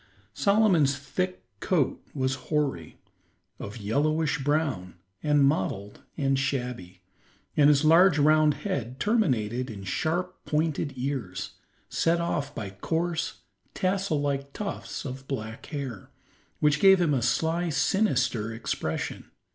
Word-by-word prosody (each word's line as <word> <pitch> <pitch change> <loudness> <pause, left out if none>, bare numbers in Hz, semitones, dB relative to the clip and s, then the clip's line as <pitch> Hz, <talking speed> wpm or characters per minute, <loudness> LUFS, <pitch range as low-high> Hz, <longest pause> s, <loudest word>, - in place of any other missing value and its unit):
Solomon's 190 -10 +3
thick 185 +7 -3 0.2
coat 160 -8 0
was 130 -1 0 0.2
hoary, 140 - -1 0.6
of 100 - -7
a 115 - -9
yellowish 155 +8 +1
brown, 140 - -1 0.3
and 150 -2 +3
mottled 100 -6 -1 0.2
and 135 -2 +1
shabby, 125 -9 -3 0.5
and 145 -1 +6
his 145 0 +4
large 165 +1 +6
round 155 0 +4
head 130 - -3
terminated 130 - +1
in 100 -3 -7
sharp, 175 - -2
pointed 155 -2 -1
ears, 125 -8 -3 0.4
set 170 +1 +1
off 145 -4 -2
by 100 -4 -5
coarse, 165 - -2 0.3
tassel 185 -4 0
like 140 -1 -2
tufts 205 -6 -5
of 135 0 -7
black 115 -4 -5
hair, 135 - -6 0.5
which 150 -1 +3
gave 195 -1 +7
him 165 -4 +2
a 130 - +1
sly, 160 +8 +1
sinister 130 - +1
expression. 115 +1 -4
145 Hz, 125 wpm, -27 LUFS, 125-165 Hz, 0.6 s, gave